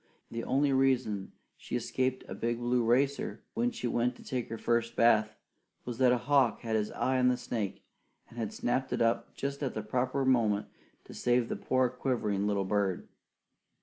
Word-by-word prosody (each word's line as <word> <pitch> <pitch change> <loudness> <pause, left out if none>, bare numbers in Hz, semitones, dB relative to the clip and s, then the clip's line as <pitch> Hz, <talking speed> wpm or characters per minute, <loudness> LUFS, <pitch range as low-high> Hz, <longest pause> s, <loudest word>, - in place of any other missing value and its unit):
The 115 0 -4
only 140 +1 +2
reason 130 -7 +1 0.3
she - - -6
escaped 130 +2 -1
a - - -6
big 120 0 -1
blue 120 0 +1
racer 140 - +1
when 240 +2 +1
she 240 0 -6
went 120 +1 +1
to - - -14
take 125 -2 -3
her 115 - -4
first 115 +1 0
bath, 110 -2 +4 0.5
was 120 -1 -5
that 130 -2 +5
a 125 - +3
hawk 130 -2 +2
had 115 -2 -2
his 105 -1 0
eye 130 0 +1
on 125 - +4
the 125 0 +3
snake 110 -5 -4 0.5
and 115 -3 -4
snapped 130 +2 -1
it - - -1
up 115 +1 +1
at - - -34
just 140 0 -3
the 125 -7 -3
proper 130 +5 0
moment 110 -6 +2 0.4
to - - -12
save 120 -1 +1
the - - -1
poor, 130 -1 +1
quivering 120 -5 -1
little 100 -2 0
bird. 100 -2 -1
120 Hz, 185 wpm, -31 LUFS, 110-130 Hz, 0.5 s, that